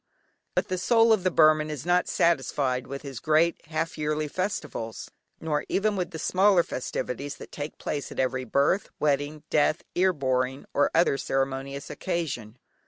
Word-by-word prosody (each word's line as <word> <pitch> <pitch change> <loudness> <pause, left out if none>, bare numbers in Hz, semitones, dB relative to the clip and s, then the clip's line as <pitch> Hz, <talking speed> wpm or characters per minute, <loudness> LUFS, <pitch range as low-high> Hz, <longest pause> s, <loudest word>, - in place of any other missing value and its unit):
But - - 0
the 185 -1 -1
soul 225 +3 +5
of 200 -5 +1
the 185 - +3
Burman 155 -2 +4
is 150 -2 -5
not 180 +1 +2
satisfied 135 -5 +1
with 140 +2 -6
his 135 -4 -6
great 160 +2 +2
half 160 +1 -3
yearly 150 0 -1
festivals, 165 - -4 0.3
nor 150 -2 -1
even 210 +1 +1
with 180 -3 -2
the 165 - -7
smaller 185 +2 +4
festivities 135 +1 -4
that - - -11
take 145 +1 -6
place 145 - -4
at - - -9
every 130 0 0
birth, 140 - +1
wedding, 145 +1 0
death, 155 +1 +2
"ear 185 +1 +3
boring," 130 -3 -1
or 145 - +3
other 160 -4 +3
ceremonious 135 +1 -2
occasion. 130 - -3
150 Hz, 165 wpm, -27 LUFS, 135-170 Hz, 0.3 s, soul